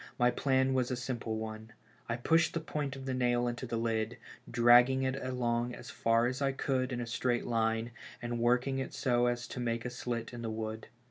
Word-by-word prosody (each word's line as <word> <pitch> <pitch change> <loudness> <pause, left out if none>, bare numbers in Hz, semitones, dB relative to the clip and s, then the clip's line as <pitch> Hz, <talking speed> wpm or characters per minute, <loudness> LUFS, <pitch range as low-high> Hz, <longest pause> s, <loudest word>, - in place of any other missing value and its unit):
My 125 0 +4
plan 130 0 +2
was 125 -2 +1
a 130 - 0
simple 120 -3 -3
one: 110 0 -6 0.4
I 115 - +1
pushed 165 +9 +2
the - - +1
point 150 -3 -3
of 135 0 -8
the 130 - -1
nail 120 -1 +2
into 120 +1 -3
the 115 - -2
lid, 115 0 -1 0.3
dragging 120 +2 +6
it 130 0 0
along 125 -2 -1
as - - -9
far 115 +1 +2
as 130 +3 -2
I 135 -1 +2
could 130 -1 -1
in 125 - -2
a 120 - -2
straight 120 +1 0
line, 115 0 0 0.3
and 120 0 -3
working 125 +3 +2
it 130 - -4
so 120 -1 +2
as 120 0 -1
to - - -6
make 115 -1 -1
a 125 - -3
slit 120 -1 -4
in 120 - -6
the 115 - -3
wood. 110 0 -4
120 Hz, 215 wpm, -32 LUFS, 115-130 Hz, 0.4 s, dragging